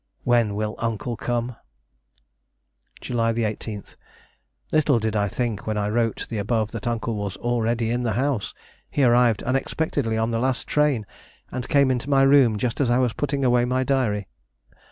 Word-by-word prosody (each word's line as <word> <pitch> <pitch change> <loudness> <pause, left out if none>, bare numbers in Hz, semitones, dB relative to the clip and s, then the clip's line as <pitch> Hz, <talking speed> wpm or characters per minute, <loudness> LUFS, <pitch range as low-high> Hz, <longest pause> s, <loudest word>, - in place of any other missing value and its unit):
When 120 -4 +2
will 105 0 -2
Uncle 115 +1 -2
come? 120 +1 -3 1.4
"July 115 -2 0
18. 110 -2 -2 0.9
Little 150 -4 +3
did 110 -1 -1
I 105 -1 +2
think 115 -2 -3
when 110 -1 -1
I 105 0 0
wrote 115 0 0
the 110 - -4
above 110 +1 0
that 115 -1 -5
Uncle 115 -1 -1
was 100 -2 -4
already 115 -1 0
in 120 +1 0
the 115 -3 0
house. 130 -2 -1 0.3
He 145 - 0
arrived 120 -3 +4
unexpectedly 135 -2 -1
on 110 +1 0
the 115 - 0
last 130 +1 0
train, 145 -7 +1 0.5
and 125 -1 -5
came 140 -2 +4
into 130 +2 -2
my 135 -1 +4
room 135 -5 +5
just 120 +5 -1
as 130 - +2
I 120 - +3
was 125 -3 +1
putting 140 -2 -1
away 120 -1 +4
my 130 +1 +1
diary. 120 -7 0
120 Hz, 170 wpm, -24 LUFS, 110-130 Hz, 1.4 s, room